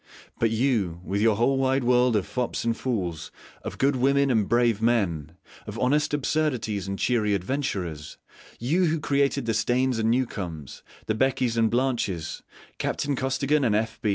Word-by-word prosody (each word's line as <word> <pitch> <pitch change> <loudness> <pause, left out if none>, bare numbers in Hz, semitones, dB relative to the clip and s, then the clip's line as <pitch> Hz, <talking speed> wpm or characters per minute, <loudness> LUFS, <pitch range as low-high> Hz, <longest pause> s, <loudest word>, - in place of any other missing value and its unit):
But 115 - +3
you, 110 -7 0
with 100 +3 -2
your 110 -1 +4
whole 135 +5 +2
wide 135 0 +1
world 125 -1 +3
of 100 -3 +1
fops 120 +5 -3
and 115 -1 +1
fools, 90 -11 -3 0.3
of - - -7
good 135 +1 +2
women 140 +2 +2
and 110 -5 +1
brave 120 -2 +2
men, 90 -10 0 0.3
of 105 +1 -6
honest 145 +5 +1
absurdities 130 - -1
and 100 0 -3
cheery 105 -4 +1
adventurers: 90 - -3 0.4
you 160 +10 +1
who 160 -1 0
created 140 -2 +1
the 115 - 0
Steynes 125 +3 +1
and 110 0 +1
Newcomes, 95 - -3 0.2
the 110 - 0
Beckys 125 0 +1
and 115 -1 +3
Blanches, 120 - -1 0.4
Captain 145 -1 -1
Costigan 135 +3 0
and 110 -4 +2
F. 110 +1 -1
120 Hz, 160 wpm, -25 LUFS, 105-135 Hz, 0.4 s, your